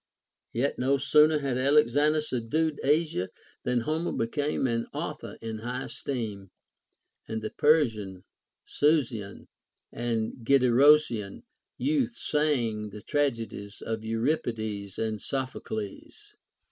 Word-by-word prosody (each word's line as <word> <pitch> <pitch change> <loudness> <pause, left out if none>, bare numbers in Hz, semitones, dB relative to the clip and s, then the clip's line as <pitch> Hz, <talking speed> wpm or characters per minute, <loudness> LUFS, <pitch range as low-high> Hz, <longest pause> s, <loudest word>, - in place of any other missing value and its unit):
Yet 130 +5 -1
no 135 +2 +2
sooner 150 +3 +5
had 135 -3 -1
Alexander 145 +2 +4
subdued 150 +3 -1
Asia, 145 - +1 0.3
than 125 -1 0
Homer 160 +7 -1
became 145 +5 -1
an 115 -2 0
author - - -5
in 110 -1 -4
high 125 +3 -4
esteem, 105 -8 -5 0.8
and 110 0 -4
the 110 - -3
Persian, 110 - +2 0.4
Susian, 125 -10 0 0.5
and 115 -2 -2
Gedrosian 125 - +4 0.3
youth 270 -5 0
sang 120 - 0
the 105 +1 -10
tragedies 115 -8 -2
of 110 -1 -2
Eurip 115 +8 0
ides 105 -4 -4
and 110 -2 -2
Sophocles. 130 -6 -5
125 Hz, 110 wpm, -28 LUFS, 110-150 Hz, 0.8 s, sooner